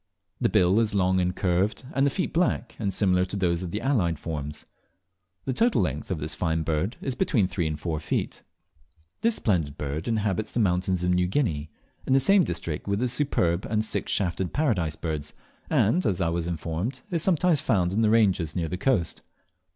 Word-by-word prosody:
The - - +2
bill 95 +4 +4
is 110 -2 0
long 95 -1 +2
and 90 0 0
curved, 95 +6 0
and 135 -1 +3
the - - +3
feet 180 +6 -2
black, 170 -7 0
and 100 -3 -1
similar 90 -2 +2
to 95 - -6
those 85 -3 0
of 90 - -4
the 105 +5 -3
allied 105 - +1
forms. 75 -1 -5 0.8
The 130 - -1
total 230 - +2
length 75 -3 -3
of 95 - -1
this 75 +1 -4
fine 80 +1 -1
bird 80 +8 -1
is 135 - -2
between 125 - +1
three 90 -2 -1
and 75 -1 -3
four 80 -1 -2
feet. - - -3 0.8
This 230 -1 +2
splendid 80 - 0
bird 75 +3 -4
inhabits 110 -2 -1
the - - 0
mountains 90 -2 +1
of 90 0 +2
New 90 0 +2
Guinea, 80 - -1 0.4
in - - +3
the 135 - +6
same 195 +8 +5
district 80 - -4
with 100 0 +1
the 125 +4 0
Superb 110 - +1
and 110 -1 +1
the - - -3
Six - - -2
shafted 90 -1 -1
Paradise 100 - 0
Birds, 75 -3 -4 0.3
and 165 - +3
I 85 -4 +1
was 85 0 -2
informed 85 - -3
is 170 -2 +1
sometimes 170 -3 +3
found 95 - +1
in 110 - +1
the 110 - +4
ranges 95 -8 +2
near 85 -3 -1
the 90 - -3
coast. 105 - 0
95 Hz, 200 wpm, -26 LUFS, 85-115 Hz, 0.8 s, the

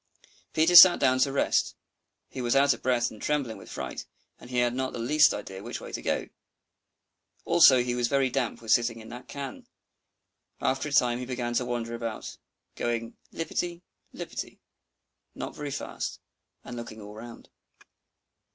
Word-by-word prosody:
Peter 160 +3 +3
sat 175 0 +11
down, 130 -1 +3
to 135 +1 +3
rest; 140 - +1 0.5
he 130 - -7
was 120 +1 +1
out 140 +1 +5
of - - -11
breath 125 -2 +1
and 110 - -13
trembling 140 -6 -1
with - - -13
fright, - - -6 0.3
and 120 - -13
he 125 - -3
had 120 -1 +2
not 130 +1 -2
the - - -5
least 150 +6 +4
idea 95 -2 -6
which - - -6
way - - -9
to - - -5
go. - - -1 1.2
Also 140 -7 +6
he 125 0 -2
was 120 -1 0
very 135 0 +2
damp 125 -2 -2
with 110 - -3
sitting 115 0 +2
in 110 - -11
that 125 +1 -10
can. 140 -2 -7 0.9
After 135 +3 -1
a - - -10
time 125 -3 +3
he 125 - -5
began 120 -2 -3
to 125 +1 0
wander 120 -1 -3
about, 115 -2 -5 0.4
going 115 -1 -3 0.2
lippity 170 +1 -3 0.3
lippity - - -7 0.8
not - - -6
very 150 -1 -5
fast, 135 - -5 0.4
and 120 - -8
looking 120 -2 -8
all 105 0 -10
round. 115 +2 -11
125 Hz, 170 wpm, -27 LUFS, 120-140 Hz, 1.2 s, sat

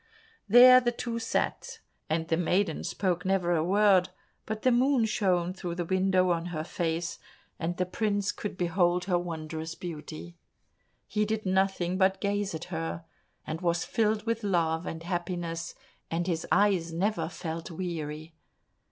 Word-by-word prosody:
There 255 +3 +9
the 240 -1 +1
two 235 -1 -4
sat, 460 - -2 0.3
and 160 +1 0
the 165 - +2
maiden 180 +4 0
spake 180 -3 -1
never 185 -2 +1
a 155 - +1
word, 195 0 +4 0.4
but 215 0 -4
the 255 - +4
moon 250 0 +3
shone 185 -5 +1
through 180 -2 -5
the 175 -1 -2
window 185 0 +2
on 170 0 -1
her 160 -3 -3
face, 165 0 -2 0.4
and 175 +2 -2
the 180 - +1
prince 205 +1 -1
could 205 -3 -6
behold 175 0 +1
her 180 -2 +2
wondrous 160 -1 -5
beauty. 170 0 -8 0.7
He 210 - 0
did 215 0 -2
nothing 185 -1 +1
but 190 0 +3
gaze 200 -2 -1
at 160 - -5
her, 165 0 -4 0.4
and 160 +1 -4
was 170 -1 0
filled 215 -1 0
with 230 -1 -1
love 165 -4 0
and 165 0 -5
happiness, 175 -1 -3 0.3
and 170 +1 -1
his 165 -3 -2
eyes 190 -5 +3
never 170 -1 -1
felt 165 0 -5
weary. 160 -2 -5
180 Hz, 155 wpm, -29 LUFS, 165-205 Hz, 0.7 s, There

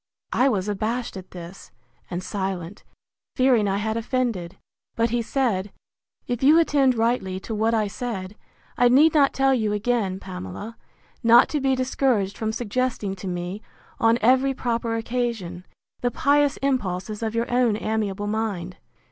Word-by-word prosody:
I 260 +2 +4
was 200 -5 -1
abashed 220 +4 -2
at 190 -1 -9
this, 175 +1 -10 0.4
and 180 +1 -4
silent, 190 -2 -4 0.5
fearing 255 -5 +3
I 195 0 0
had 220 +1 -1
offended: 230 -7 -2 0.4
But 230 0 +1
he 240 0 +1
said, 220 -6 -1 0.5
If 245 -1 -3
you 295 +4 +6
attend 280 -6 +3
rightly 225 -5 0
to 225 - -6
what 220 +2 +1
I 215 -1 +2
said, 200 -2 -5 0.4
I 245 0 +6
need 295 +6 +6
not 285 -3 +4
tell 270 0 +2
you 215 -5 0
again, 210 -3 0
Pamela, 180 - -7 0.5
not 235 0 +6
to 295 - -1
be 265 0 +2
discouraged 255 -6 0
from 220 -1 -2
suggesting 225 -3 -2
to 190 - -7
me, 180 +3 -4 0.4
on 225 +1 +4
every 260 +4 +3
proper 230 -2 -1
occasion, 225 -7 -3 0.3
the 245 - 0
pious 285 +3 +2
impulses 210 -6 -1
of 225 0 -2
your 230 0 +1
own 245 -4 +3
amiable 210 -2 -2
mind. 205 -5 -3
225 Hz, 155 wpm, -24 LUFS, 195-250 Hz, 0.5 s, you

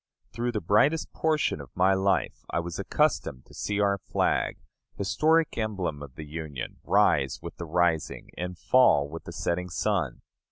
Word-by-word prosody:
Through 120 +1 -2
the 105 - -1
brightest 135 - +2
portion 155 - +1
of 70 - -11
my 95 +1 +4
life 95 0 0
I - - 0
was 85 0 -5
accustomed 65 - 0
to - - -18
see 105 0 -2
our 100 -1 +2
flag, 80 - 0 0.4
historic 160 - +2
emblem 95 -9 -2
of 70 -3 -10
the 80 - -7
Union, 75 -5 -6
rise 70 -2 +3
with - - -8
the 85 - -6
rising 85 -1 0
and 90 0 -5
fall 110 - +4
with 80 +3 -8
the - - -7
setting 90 +1 -2
sun. 90 - -1
90 Hz, 165 wpm, -27 LUFS, 80-105 Hz, 0.4 s, my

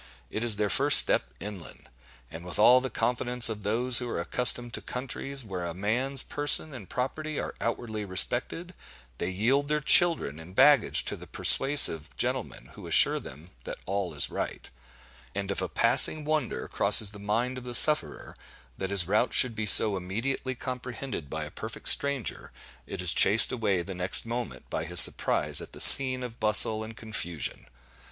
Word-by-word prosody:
It 110 - -6
is 115 -3 +4
their 105 0 -3
first - - +4
step 65 - 0
inland; 100 -5 -12 0.4
and 80 +1 -11
with 90 - -8
all 125 +4 +3
the 130 - -6
confidence 125 +1 -1
of 105 -2 -8
those 120 +4 0
who 125 -1 -7
are - - -6
accustomed 120 -1 -1
to - - -6
countries 135 +1 -7
where 95 -4 -8
a 85 -1 -7
man's 125 +8 -1
person 145 +1 +2
and 115 -8 -13
property 150 +4 -6
are - - -7
outwardly 115 -2 -6
respected, 125 - -2 0.5
they 85 - -4
yield 120 +10 -2
their 150 +1 -2
children 155 - +1
and 85 +3 -15
baggage 145 -3 +2
to - - -4
the - - -15
persuasive 135 - +4
gentlemen - - -4
who - - -13
assure - - +2
them 75 +7 -15
that - - -9
all 95 -4 -5
is 70 - +1
right; - - -8 0.6
and 100 0 -5
if 100 - -4
a 90 - -5
passing 130 - +1
wonder 155 -4 -4
crosses 105 -2 +3
the 105 - -14
mind 115 +5 -4
of - - -16
the 125 -1 -5
sufferer, 150 +5 +2 0.4
that 95 - -5
his 100 -4 -1
route 105 +5 -2
should 125 -3 +2
be 105 0 -6
so 105 +1 +4
immediately 115 +8 -6
comprehended 125 - -9
by - - -6
a - - -11
perfect - - -10
stranger, 140 -5 -3 0.4
it 90 - -8
is 90 - +3
chased 105 +3 +4
away 100 -7 -3
the 95 - -9
next 90 +4 0
moment 120 +1 -8
by - - -6
his - - +6
surprise - - +6
at - - -13
the - - -13
scene 130 -2 +8
of 120 -1 -11
bustle 110 0 +2
and 110 +1 -12
confusion. 85 - -6
115 Hz, 180 wpm, -25 LUFS, 100-130 Hz, 0.6 s, scene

